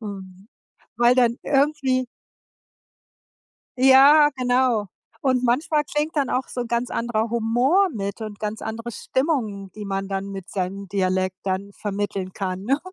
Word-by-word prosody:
W 200 -3 -6 0.7
weil 240 +1 +5
dann 240 -2 +3
irgendwie 270 -3 +1 1.7
Ja, 275 +3 +7
genau. 245 -4 +1 0.3
Und 255 -2 +1
manchmal 295 +5 +1
klingt 300 +2 -2
dann 280 -3 0
auch 260 - -1
so 245 -1 -4
ganz 235 +1 -1
anderer 230 -1 -1
Humor 245 - +2
mit 200 +1 -4
und 210 -2 -7
ganz 215 0 -4
andere 230 +2 -5
Stimmung, 220 - -2
die 210 -1 -7
man 195 0 -3
dann 195 0 -4
mit 195 -2 -8
seinem 195 +1 -4
Dialekt 185 -1 0
dann 195 +1 -3
vermitteln 200 -2 -4
kann, 190 -1 -4
ne? 275 +7 +1
230 Hz, 140 wpm, -23 LUFS, 200-260 Hz, 1.7 s, Ja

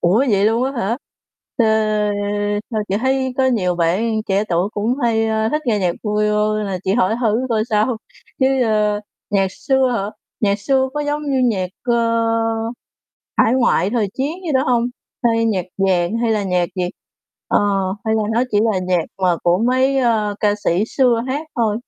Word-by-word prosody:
Ủa, 180 +6 +3
vậy 200 0 +3
luôn 225 +3 +2
á 270 - -2
hả? 225 +5 0 0.6
Ờ, 235 - +3 1.1
sao 215 -2 -1
chị 195 - 0
thấy 260 0 0
có 260 - +4
nhiều 190 -8 +1
bạn 195 +7 +1
trẻ 195 +2 +2
tuổi 175 +3 +1
cũng 215 +4 0
hay, 225 -1 +2
a, 220 0 0
thích 300 +4 -1
nghe 215 -3 +2
nhạc 180 -3 +1
Bolero 210 0 +1
nên 215 -1 -2
là 190 -2 -3
chị 190 - +1
hỏi 220 -2 +2
thử 225 -1 +2
coi 220 -2 +1
sao. 215 +3 +2 0.4
Chứ, 265 0 +3
ơ, 210 -2 +1 0.3
nhạc 195 -1 +2
xưa 265 +1 +1
hả? 200 -1 -2 0.3
Nhạc 200 -1 +2
xưa 265 +4 +1
có 295 - -1
giống 295 +1 -2
như 265 - +1 0.2
nhạc, 185 -1 -2
ơ, 240 - +1 1.4
hải 225 - +4
ngoại, 235 -7 +2
thời 225 -3 0
chiến 275 +4 -1
gì 310 - -1
đó 260 - +3
hông? 240 -2 +2 0.4
Hay 230 -1 +3
nhạc 200 -6 0
vàng, 190 +1 +1
hay 230 -1 +2
là 210 -1 0
nhạc 180 -2 0
gì? 180 - 0 0.6
Ờ, - - +3 0.4
hay 220 0 +1
là 220 - +1
nó 235 +2 +2
chỉ 205 - +2
là 190 - 0
nhạc 180 -2 0 0.2
mà 180 -2 +3
của 175 +1 +3
mấy, 260 +4 +2
ơ, 220 -4 +1
ca 205 -1 +3
sĩ 180 +5 +2
xưa 240 -3 +2
hát 290 +4 -2
thôi? 220 -3 +1
220 Hz, 190 wpm, -19 LUFS, 200-245 Hz, 1.4 s, có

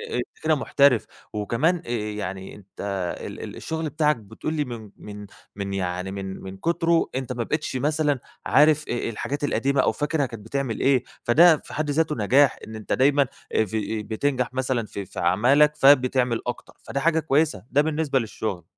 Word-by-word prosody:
انت 120 0 -5
كده 155 0 +3
محترف، 140 -4 +3 0.3
وكمان 115 - +1
آآ - - -10
يعني 105 -4 -4
أنت 100 -2 -13 0.4
ال - - -7
ال - - -7
الشغل 160 -1 -4
بتاعك 150 0 +2
بتقول 115 +7 -6
لي 150 -2 0
من 115 -5 -8
من 105 0 -9 0.3
من 100 -1 -4
يعني 90 0 -3
من 95 -1 -6
من 95 0 -8
كُتره 170 - +1
أنت 130 -1 -3
ما 120 -1 -2
بقيتش 150 +2 -3
مثلًا 145 0 +1 0.3
عارف 150 +1 +4
آآ - - 0
آآ 120 - -2
الحاجات 120 +6 -4
القديمة 140 -1 +1
أو - - +2
فاكرها 150 -1 -1
كانت 115 -4 -9
بتعمل 130 -1 -2
إيه، 135 -2 +3 0.2
فده 160 +7 +6
في - - -13
حد 155 0 -2
ذاته 155 +1 +1
نجاح 130 +5 +3
إن 110 - -8
أنت 110 -1 -4
دايمًا 140 +2 +4 0.3
آآ 110 - +3
ف - - -13 0.4
بتنجح 125 +3 -1
مثلًا 130 -3 -1
في 100 -2 -6
في - - -8
أعمالك 135 +12 +4
فبتعمل 130 -4 +4
أكتر 125 - -5
فده 140 - -3
حاجة 160 +3 +2
كويسة. 150 - +1
ده 145 - +4
بالنسبة 150 -3 0
للشغل. 110 -5 -4
130 Hz, 180 wpm, -24 LUFS, 110-150 Hz, 0.4 s, فده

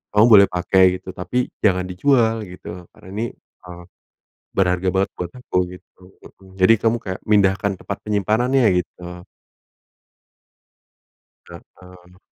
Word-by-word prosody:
Kamu 105 +1 +6
boleh 100 -3 +8
pakai 95 +1 +2 0.2
gitu, 95 - -11
tapi 125 +8 -3 0.2
jangan 95 -2 +2
dijual 115 +4 +2
gitu, 90 -1 -10
karena - - -18
ini, 110 +3 -2 0.4
eee, 90 -1 -11 0.7
berharga 90 -1 0
banget 95 +1 +1
buat 85 -1 -5
aku," 125 - -4 0.2
gitu. 90 - -17 0.2
Heeh, 95 -1 -17
jadi, 95 +5 +6
kamu 115 +1 +2
kayak 95 0 -5
mindahkan 100 -1 +2
tempat - - -6
penyimpanannya, 110 +6 +1 0.2
gitu. 90 +1 -12 2.2
Mhm. 90 0 -16
95 Hz, 120 wpm, -20 LUFS, 90-105 Hz, 2.2 s, boleh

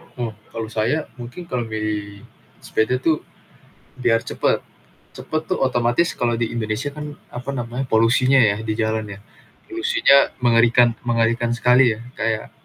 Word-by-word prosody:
Ah, 125 -8 -6 0.2
kalau 115 -1 -5
saya 115 +8 -1
mungkin 125 +8 -9
kalau 125 -5 -2
milih 105 -2 -4 0.4
sepeda 120 +3 0
tuh 155 +1 0 0.7
biar 120 -2 +2
cepet. - - 0 0.6
Cepet 155 0 -3
tuh 185 - 0
otomatis 120 +6 +2
kalau 120 -1 +1
di 115 -1 -2
Indonesia 115 +4 -2
kan, 150 0 -7 0.2
apa 125 +2 -8
namanya, 120 +2 -3
polusinya 120 +4 +3
ya 105 -5 +4
di 110 -1 -3
jalan 110 -1 -1
ya, - - -13 0.5
polusinya 345 - +3 0.2
mengerikan 120 +1 +5 0.2
mengerikan 115 0 +1
sekali 125 -1 +4
ya, - - -12 0.2
kayak 110 0 -2
120 Hz, 140 wpm, -21 LUFS, 110-130 Hz, 0.7 s, mengerikan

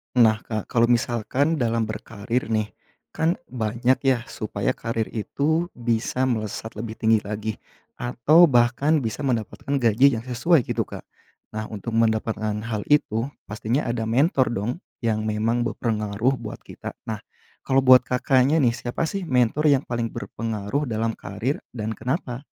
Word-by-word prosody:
Nah, 110 -3 +5
Kak. 110 -1 -5
Kalau 115 -1 +4
misalkan 120 +6 +1
dalam 115 -2 +1
berkarier 110 +2 -3
nih, 110 -2 -1 0.4
kan 165 +2 +1 0.2
banyak 120 +2 +1
ya, 130 -3 +3
supaya 100 -2 -2
karier 115 -1 -3
itu 155 +9 0
bisa 120 +1 -1
melesat 110 -3 -2
lebih 110 0 -5
tinggi 110 0 +3
lagi, 105 +1 -4 0.5
atau 140 +8 +5
bahkan 130 +4 +3
bisa 115 +5 -3
mendapatkan 120 +2 -2
gaji 125 +1 +4
yang 110 - -5
sesuai, 130 +5 +2
gitu, - - -2
Kak. - - -8 0.5
Nah, 110 0 -4
untuk 110 +2 -6
mendapatkan 110 -1 0
hal 110 -3 -3
itu, 125 -5 +2 0.2
pastinya 110 +6 -1
ada 115 -1 -1
mentor 130 - +3
dong, 105 +2 -1 0.3
yang 110 -1 0
memang 110 +3 0
berpengaruh 110 +1 0
buat - - -7
kita. - - -8
Nah, 110 -2 -4 0.5
kalau 135 0 +3
buat 130 0 +9
Kakaknya 130 +3 +3
nih, 120 - +4
siapa 120 +5 -3
sih, 185 +1 -4
mentor 130 +4 +2
yang 140 -1 +4
paling 120 -1 -2
berpengaruh 115 +4 -3
dalam 115 0 -1
karier 110 +9 -3 0.2
dan 110 -1 -3
kenapa? 125 +1 -3
115 Hz, 150 wpm, -24 LUFS, 110-130 Hz, 0.5 s, buat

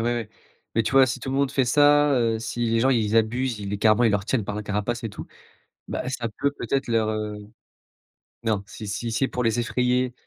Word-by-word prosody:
ouais, 120 -3 -3 0.5
mais 115 - +3
tu 110 - -3
vois 135 -1 +6
si 120 - -3
tout 135 - -4
le 135 - -1
monde 140 -1 +1
fait 135 -1 +1
ça, 145 +3 +4
heu, 115 -4 +1
si 115 +1 -3
les 115 0 +1
gens 130 +3 +3
ils 115 -3 +1
abusent, 120 +2 +1
ils 100 -1 -5
les 105 - -2
carrément, 110 +3 +4
ils 115 - +4
leur 100 -1 -1
tiennent 120 -3 0
par 105 - -4
la 105 - -4
carapace 105 +4 -2
et - - -1
tout, 105 - -9 0.6
bah, - - -3
ça 125 -3 -3
peut, 140 - +2
peut-être 140 -1 -2
leur, 115 -2 +1
heu, 105 -1 -3 1.1
non, 110 -3 0
si 110 0 -9
si 115 +3 -3
c'est 125 +4 +1
pour 125 - -3
les 115 0 +1
effrayer, 125 +1 0
115 Hz, 235 wpm, -24 LUFS, 110-130 Hz, 1.1 s, vois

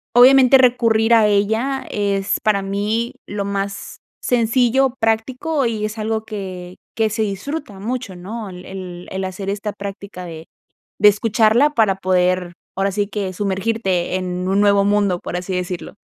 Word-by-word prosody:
obviamente, 265 +1 +7
recurrir 235 -2 +3
a 220 - +5
ella 220 +7 0
es 200 -1 0
para 210 -2 +2
mí 210 +4 -1
lo 200 0 -3
más 200 0 -4 0.2
sencillo, 245 +2 +2
práctico, 250 +6 0
y 215 -2 -2
es 215 +1 -5
algo 220 0 -1
que 185 -4 -7 0.2
que 220 -1 +1
se 215 +1 0
disfruta 210 +2 -5
mucho, 230 -2 -4
¿no? 205 +4 -7
El 180 0 -10
el 180 -2 -8
el 190 0 -3
hacer 190 +1 -5
esta 205 +1 -3
práctica 200 -2 -8
de 160 -1 -9 0.5
de 210 - +8
escucharla 225 +6 +3
para 215 -8 +2
poder, 180 -1 +1 0.2
ahora 195 0 +1
sí 205 +1 -1
que 200 -3 -4
sumergirte 195 -2 -1
en 180 0 -3
un 195 +2 +2
nuevo 200 -1 +4
mundo, 205 -3 +2
por 175 - -6
así 185 +1 -4
decirlo. 180 +1 -4
205 Hz, 155 wpm, -20 LUFS, 190-225 Hz, 0.5 s, de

